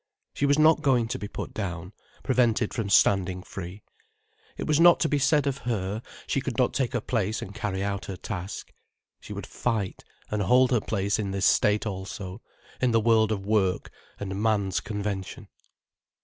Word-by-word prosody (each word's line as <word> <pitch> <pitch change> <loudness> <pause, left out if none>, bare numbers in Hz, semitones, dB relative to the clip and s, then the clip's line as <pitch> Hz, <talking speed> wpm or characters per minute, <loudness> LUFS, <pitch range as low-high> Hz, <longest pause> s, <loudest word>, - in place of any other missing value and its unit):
She 140 - 0
was 140 +1 +4
not 155 +1 +5
going 125 -5 +3
to - - -3
be 105 - -5
put - - -6
down, 90 -2 -5 0.3
prevented 120 -4 +2
from 110 -4 -2
standing 95 -2 +3
free. 95 +2 -8 0.7
It - - -3
was 150 0 +2
not 175 0 +7
to 160 - +3
be 145 -2 +1
said 150 +1 +3
of 140 -1 -1
her, 105 -1 -2 0.2
she - - 0
could - - -4
not - - +2
take 130 -1 -1
her 120 - 0
place 110 -3 -1
and 100 - -7
carry 100 -3 -3
out 100 -1 -2
her 95 - -6
task. 95 0 -6 0.5
She - - -12
would - - -5
fight 100 -5 -2 0.3
and 105 -1 0
hold 125 +6 +4
her 120 -4 +3
place 100 0 -1
in 100 -2 -2
this 95 0 0
state 105 +1 +3
also, 95 0 -6 0.4
in 130 - +3
the 115 -1 +3
world 110 -1 +3
of 100 -2 -2
work 100 -3 +1 0.3
and 95 0 -4
man's 100 -5 +1
convention. 100 -2 -5
105 Hz, 185 wpm, -27 LUFS, 95-120 Hz, 0.7 s, not